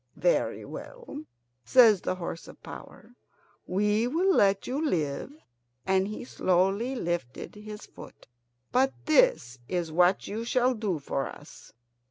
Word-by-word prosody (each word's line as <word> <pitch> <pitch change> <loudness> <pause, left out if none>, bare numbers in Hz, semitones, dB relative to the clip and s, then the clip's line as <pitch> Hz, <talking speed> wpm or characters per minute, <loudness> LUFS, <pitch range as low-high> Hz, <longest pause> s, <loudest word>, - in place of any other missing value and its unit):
"Very - - +1
well," 470 - -9 0.4
says 225 -7 +6
the - - -1
horse 170 -2 -6
of - - -14
power; 230 - -11 0.6
"we 210 +4 +1
will 355 +8 +2
let 195 - +3
you 275 +5 -2
live," 155 - -1 0.5
and 190 0 +2
he 210 - -6
slowly 195 +5 +1
lifted 175 - -3
his 210 0 -9
foot. - - -13 0.5
"But 265 +2 +3
this 310 - +3
is 175 -3 -2
what 180 +3 +3
you 220 +3 -4
shall 250 +2 +2
do 210 -7 -2
for 140 -1 -3
us. 145 - -13
210 Hz, 135 wpm, -28 LUFS, 180-255 Hz, 0.6 s, says